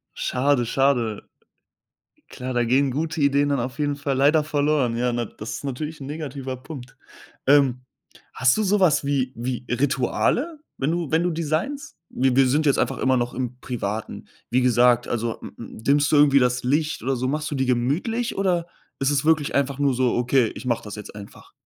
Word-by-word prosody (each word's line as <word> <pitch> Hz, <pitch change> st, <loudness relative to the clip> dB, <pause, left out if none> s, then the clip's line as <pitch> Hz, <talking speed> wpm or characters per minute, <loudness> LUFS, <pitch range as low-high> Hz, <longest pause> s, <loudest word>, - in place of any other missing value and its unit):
Schade, 130 Hz, -1 st, +1 dB
schade. 120 Hz, -5 st, +1 dB, 1.1 s
Klar, 130 Hz, 0 st, -5 dB
da 120 Hz, 0 st, +2 dB
gehen 135 Hz, +3 st, +2 dB
gute 160 Hz, +3 st, -2 dB
Ideen 140 Hz, 0 st, +3 dB
dann 140 Hz, -3 st, +1 dB
auf 130 Hz, +4 st, -5 dB
jeden 145 Hz, -1 st, 0 dB
Fall 140 Hz, -1 st, -2 dB
leider 150 Hz, +3 st, +4 dB
verloren. 145 Hz, -5 st, +1 dB
Ja, 125 Hz, 0 st, 0 dB
na 120 Hz, 0 st, -1 dB
das 105 Hz, +2 st, -9 dB
ist -, -, -9 dB
natürlich 150 Hz, +4 st, -5 dB
'n 135 Hz, -, -7 dB
negativer 140 Hz, -3 st, -5 dB
Punkt. 130 Hz, -1 st, -10 dB, 0.5 s
Ähm, 135 Hz, -3 st, +4 dB, 0.5 s
hast 125 Hz, +1 st, +3 dB
du 215 Hz, -, +1 dB
so 205 Hz, +1 st, +2 dB
was 150 Hz, -6 st, +3 dB
wie 135 Hz, -2 st, 0 dB
wie 125 Hz, +1 st, -4 dB
Rituale, 145 Hz, -, 0 dB, 0.2 s
wenn 140 Hz, +3 st, 0 dB
du 170 Hz, -3 st, -2 dB
wenn 160 Hz, +1 st, +2 dB
du 175 Hz, -, +1 dB
designst? 165 Hz, -, -3 dB
Wi 130 Hz, -1 st, +1 dB
wir 135 Hz, 0 st, +5 dB
sind 150 Hz, +4 st, +1 dB
jetzt 140 Hz, -, +3 dB
einfach -, -, 0 dB
immer 130 Hz, 0 st, +2 dB
noch 120 Hz, 0 st, -1 dB
im 125 Hz, -1 st, -4 dB
Privaten. 110 Hz, -4 st, -5 dB, 0.2 s
Wie 125 Hz, +1 st, +2 dB
gesagt, 125 Hz, 0 st, +3 dB
also 115 Hz, -1 st, -2 dB
m -, -, -9 dB
m 115 Hz, -, -9 dB
dimmst 145 Hz, +3 st, +3 dB
du -, -, +5 dB
irgendwie 145 Hz, -1 st, +6 dB
das 125 Hz, -1 st, +1 dB
Licht 150 Hz, +3 st, 0 dB
oder 135 Hz, +2 st, 0 dB
so? 130 Hz, +1 st, -2 dB
Machst 150 Hz, +2 st, -2 dB
du 145 Hz, -, -3 dB
dir 130 Hz, -1 st, 0 dB
gemütlich, 150 Hz, -, 0 dB
oder 180 Hz, -3 st, 0 dB, 0.3 s
ist 135 Hz, 0 st, +1 dB
es 145 Hz, -1 st, +1 dB
wirklich 155 Hz, -2 st, +2 dB
einfach 140 Hz, -1 st, 0 dB
nur 140 Hz, -2 st, +2 dB
so: 125 Hz, -1 st, +1 dB
„Okay, 125 Hz, -1 st, +2 dB
ich -, -, -9 dB
mache 115 Hz, -2 st, -1 dB
das 105 Hz, -, -7 dB
jetzt 105 Hz, -, -9 dB
einfach?“ 100 Hz, -1 st, -12 dB
135 Hz, 200 wpm, -23 LUFS, 125-150 Hz, 1.1 s, irgendwie